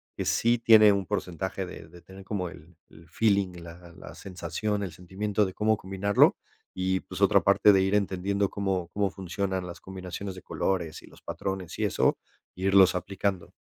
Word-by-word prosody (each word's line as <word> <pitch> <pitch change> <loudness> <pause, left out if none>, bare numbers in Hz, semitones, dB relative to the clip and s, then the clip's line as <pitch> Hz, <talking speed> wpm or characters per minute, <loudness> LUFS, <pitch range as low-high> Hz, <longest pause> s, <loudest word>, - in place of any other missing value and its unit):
que - - -3
sí 120 +1 +2
tiene 110 -2 +7
un 100 -1 -1
porcentaje 95 -1 -3
de 85 -2 -10
de 85 +1 -15
tener 95 +2 -13
como 95 -3 -3
el 85 0 -15
el 80 0 -17
feeling, 100 -1 +1
la 85 +1 -12
la - - -11
sensación, 95 +3 -4
el 95 -5 -4
sentimiento 100 +4 -1
de 95 - -5
cómo 110 +2 +2
combinarlo, 95 +1 +2 0.4
y, 95 0 -1
pues, - - -9
otra - - +5
parte 105 - +5
de 95 - +4
ir 95 +2 +1
entendiendo 100 0 0
cómo 95 -4 -2
cómo 100 -1 +1
funcionan 95 0 -3
las 85 - -9
combinaciones 95 0 -7
de 95 - -10
colores 85 -5 -2
y - - -16
los - - -18
patrones 95 -3 -5
y - - 0
eso, - - +2 0.4
irlos 95 0 +4
aplicando. 95 0 -3
95 Hz, 180 wpm, -27 LUFS, 90-100 Hz, 0.4 s, tiene